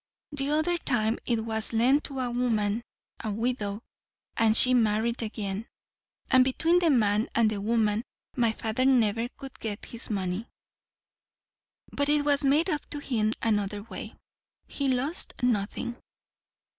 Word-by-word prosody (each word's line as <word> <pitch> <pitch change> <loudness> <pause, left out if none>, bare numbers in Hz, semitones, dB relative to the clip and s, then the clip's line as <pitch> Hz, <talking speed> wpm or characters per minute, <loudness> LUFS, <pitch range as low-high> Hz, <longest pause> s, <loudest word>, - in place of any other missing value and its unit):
The 280 -1 -2
other 315 +3 +1
time 225 -6 0
it 230 -2 0
was 220 0 -2
lent 255 +6 +3
to 270 -2 -3
a 245 -1 -2
woman, 225 -3 0 0.4
a 220 - -2
widow; 215 -1 -2 0.5
and 225 -1 +4
she 255 - +7
married 230 0 +1
again, 210 -1 -4 0.6
and 255 -1 +7
between 325 +7 +3
the 345 -2 +2
man 215 -5 +2
and 225 -2 +3
the 205 -2 -3
woman 220 0 +1 0.3
my 235 -3 +2
father 220 +3 -2
never 235 -3 +3
could 270 -2 -10
get 210 -2 -5
his 235 - -2
money. 195 +1 -2 1.4
But 285 0 -1
it 295 0 +3
was 285 0 +3
made 290 +5 +3
up 300 -5 -1
to - - -4
him 225 -6 0
another 205 -2 0
way. 230 - -8 0.5
He 280 - -3
lost 265 +6 -1
nothing." 240 +1 -1
235 Hz, 145 wpm, -27 LUFS, 215-265 Hz, 1.4 s, she